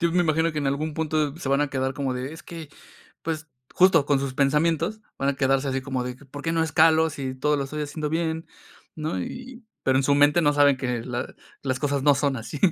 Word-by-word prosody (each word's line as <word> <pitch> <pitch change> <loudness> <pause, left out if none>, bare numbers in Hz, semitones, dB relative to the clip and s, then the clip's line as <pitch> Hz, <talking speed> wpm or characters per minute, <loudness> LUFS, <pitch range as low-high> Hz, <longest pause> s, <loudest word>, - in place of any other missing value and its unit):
yo 170 -1 +1
me 180 - +3
imagino 160 0 +1
que 155 - -3
en 145 - -1
algún 150 +3 -1
punto 155 -2 -1
se 165 -5 -5
van 140 +1 +3
a 145 - +1
quedar 130 0 -1
como 135 -2 -2
de, 130 +3 -4
es 165 +2 -10
que, 165 -3 -9 0.5
pues, 160 -1 -4 0.3
justo 180 -5 +5
con 145 -2 +3
sus 135 -2 -3
pensamientos, 165 +8 +1 0.2
van 135 +1 +1
a 140 - -4
quedarse, 135 0 +1
así 135 0 -1
como 130 -2 -3
de 125 0 -5
que, 140 - -17
¿por 145 +2 -9
qué 165 - -1
no 165 0 +2
escalo 160 +1 +4
si 135 -3 -5
todo 150 +3 +1
lo 140 - -1
estoy 150 +3 -4
haciendo 150 +1 -3
bien?, 160 0 -1 0.5
¿no?, 155 -11 -3
y, 250 - -8 0.2
pero 130 0 +3
en - - +2
su 140 +2 +3
mente 145 +4 +4
no 145 -2 +4
saben 145 -1 +4
que 125 -3 -2
la 125 -1 -4 0.3
las 130 -2 -1
cosas 140 -1 -1
no 145 0 +5
son 140 -1 0
así. 115 +6 -6
145 Hz, 245 wpm, -25 LUFS, 135-160 Hz, 0.5 s, justo